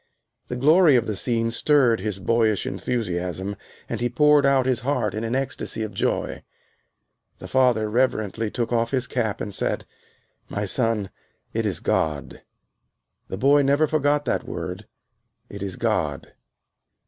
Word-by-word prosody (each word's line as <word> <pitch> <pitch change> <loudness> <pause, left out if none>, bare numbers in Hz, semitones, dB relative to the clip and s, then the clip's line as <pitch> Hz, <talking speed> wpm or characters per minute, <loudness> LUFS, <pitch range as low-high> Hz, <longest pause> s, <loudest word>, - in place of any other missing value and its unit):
The 125 - -4
glory 155 +4 +5
of 120 -2 +3
the 105 - -3
scene 115 +1 0
stirred 125 -2 +3
his 105 0 -3
boyish 110 +1 +1
enthusiasm 95 -3 -3 0.3
and 115 -1 -4
he 120 - +1
poured 150 +2 +4
out 135 -2 +3
his 130 -3 +1
heart 120 -5 -1
in 110 +2 -3
an 115 +2 -1
ecstasy 135 -4 -3
of 110 - -5
joy. - - -1 1.0
The - - -9
father 125 -5 +2
reverently 110 -2 0
took 120 +2 -2
off 115 0 +1
his 130 -1 -1
cap 115 -3 -2
and 105 - -4
said, - - -2 0.6
"My 105 0 -2
son, 110 -1 0 0.4
it - - 0
is - - -2
God." 75 -3 -1 0.9
The 95 - -5
boy 140 +6 +4
never 140 +3 +3
forgot 145 -1 +1
that - - 0
word, - - -6 0.6
"It 100 - -9
is 95 -2 -3
God." - - -2
115 Hz, 150 wpm, -24 LUFS, 105-135 Hz, 1.0 s, glory